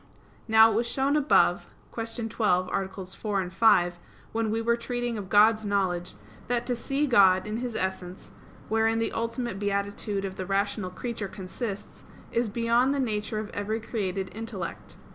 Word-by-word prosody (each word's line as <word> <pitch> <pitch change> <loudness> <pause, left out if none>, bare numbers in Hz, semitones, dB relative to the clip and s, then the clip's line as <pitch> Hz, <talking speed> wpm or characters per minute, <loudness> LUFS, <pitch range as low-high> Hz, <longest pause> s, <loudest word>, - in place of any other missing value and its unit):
Now 220 0 +7
it - - -1
was 235 +2 +1
shown 270 +4 +1
above 300 -1 +3 0.3
(Q. 230 0 -4
12, 185 -5 +1
AA. 195 - -1 0.2
4, 195 0 -3
5), 185 -4 +4 0.3
when 225 -1 -1
we 220 +1 0
were 235 +1 +2
treating 240 0 -3
of 200 -3 -6
God's 215 +3 +5
knowledge, 185 - -1 0.3
that 240 0 0
to 245 - -1
see 275 +5 -1
God 195 -8 +5
in 215 +1 -3
His 240 -1 -4
essence, 190 -1 -4 0.4
wherein 225 +1 +2
the 225 - 0
ultimate 230 -2 -3
beatitude 200 0 -2
of 190 -1 -6
the 185 - -4
rational 200 0 0
creature 220 +2 -4
consists, 195 +3 -6 0.3
is 235 -1 0
beyond 235 +5 +2
the - - -1
nature 215 -3 -1
of 215 0 -4
every 210 +2 -2
created 195 -4 -3
intellect. 175 - -6
215 Hz, 160 wpm, -27 LUFS, 195-230 Hz, 0.4 s, Now